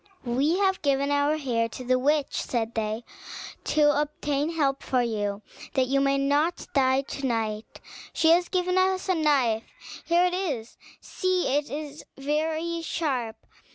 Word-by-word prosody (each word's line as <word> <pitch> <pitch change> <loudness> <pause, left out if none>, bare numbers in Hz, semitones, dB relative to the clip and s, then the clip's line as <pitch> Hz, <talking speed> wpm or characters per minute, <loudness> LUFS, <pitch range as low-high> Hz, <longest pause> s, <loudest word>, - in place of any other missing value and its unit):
"We 275 +8 +1
have 385 -1 +1
given 280 -1 +1
our 285 +2 +2
hair 235 -6 -1
to 255 - -8
the 255 +1 +2
witch," 290 +2 +1
said 230 -2 -2
they, 220 +1 -2 0.6
"to 295 -1 +3
obtain 295 0 -2
help 275 -4 0
for 255 -2 +1
you, 205 -3 -2 0.3
that 260 - +3
you 275 +2 +1
may 275 0 +2
not 290 +5 +1
die 265 -1 +3
to 275 0 -6
night. 220 -2 -3 0.3
She 320 - +2
has 350 +1 +3
given 365 0 +1
us 375 0 +1
a 375 - +3
knife: 275 -9 +2 0.4
here 345 +1 +3
it 360 - 0
is, 290 -12 -3 0.3
see 370 -7 0
it 290 0 0
is 295 0 -6
very 315 +4 -1
sharp. 255 -9 -3
285 Hz, 155 wpm, -26 LUFS, 255-320 Hz, 0.6 s, to